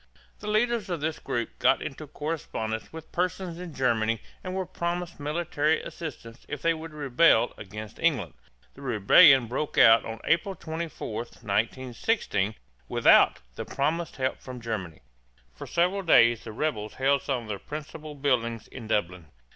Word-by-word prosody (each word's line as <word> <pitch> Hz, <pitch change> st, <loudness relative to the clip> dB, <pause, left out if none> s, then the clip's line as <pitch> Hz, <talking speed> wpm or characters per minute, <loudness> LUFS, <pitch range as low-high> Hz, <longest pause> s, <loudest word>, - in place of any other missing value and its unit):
The 210 Hz, -, -8 dB
leaders 215 Hz, -1 st, +1 dB
of 175 Hz, -2 st, -2 dB
this 155 Hz, +2 st, -2 dB
group 120 Hz, -1 st, -4 dB
got 135 Hz, -, +4 dB
into 150 Hz, +2 st, -7 dB
correspondence 140 Hz, -8 st, -4 dB
with 160 Hz, -1 st, -10 dB
persons 180 Hz, -1 st, -2 dB
in 180 Hz, -2 st, -7 dB
Germany 115 Hz, -3 st, +1 dB, 0.2 s
and 185 Hz, 0 st, -4 dB
were 190 Hz, -1 st, -1 dB
promised 175 Hz, 0 st, -4 dB
military 155 Hz, 0 st, 0 dB
assistance 125 Hz, -7 st, -8 dB
if 145 Hz, -, -4 dB
they 165 Hz, -, +3 dB
would 160 Hz, 0 st, -8 dB
rebel 145 Hz, -4 st, +3 dB
against 105 Hz, +1 st, -9 dB
England. 125 Hz, -, +1 dB, 0.4 s
The 135 Hz, -, -14 dB
rebellion 125 Hz, +2 st, +6 dB
broke 130 Hz, +6 st, -3 dB
out 115 Hz, 0 st, +7 dB, 0.2 s
April 190 Hz, +4 st, +1 dB
24, 160 Hz, -8 st, -5 dB
1916, 115 Hz, -, -1 dB, 0.3 s
without -, -, +5 dB
the -, -, -5 dB
promised 160 Hz, +4 st, -2 dB
help 130 Hz, -1 st, -1 dB
from 125 Hz, -1 st, -8 dB
Germany. 105 Hz, -9 st, -5 dB, 0.5 s
For -, -, -9 dB
several 180 Hz, +3 st, +1 dB
days 120 Hz, -, +5 dB
the 110 Hz, -, -6 dB
rebels 110 Hz, -4 st, -3 dB
held 135 Hz, +1 st, +2 dB
some 130 Hz, -4 st, -2 dB
of 110 Hz, -, -11 dB
the 100 Hz, -2 st, -3 dB
principal 150 Hz, 0 st, -8 dB
buildings 120 Hz, -5 st, 0 dB
in 115 Hz, -4 st, -9 dB
Dublin. 90 Hz, -6 st, -1 dB
140 Hz, 150 wpm, -27 LUFS, 115-165 Hz, 0.5 s, out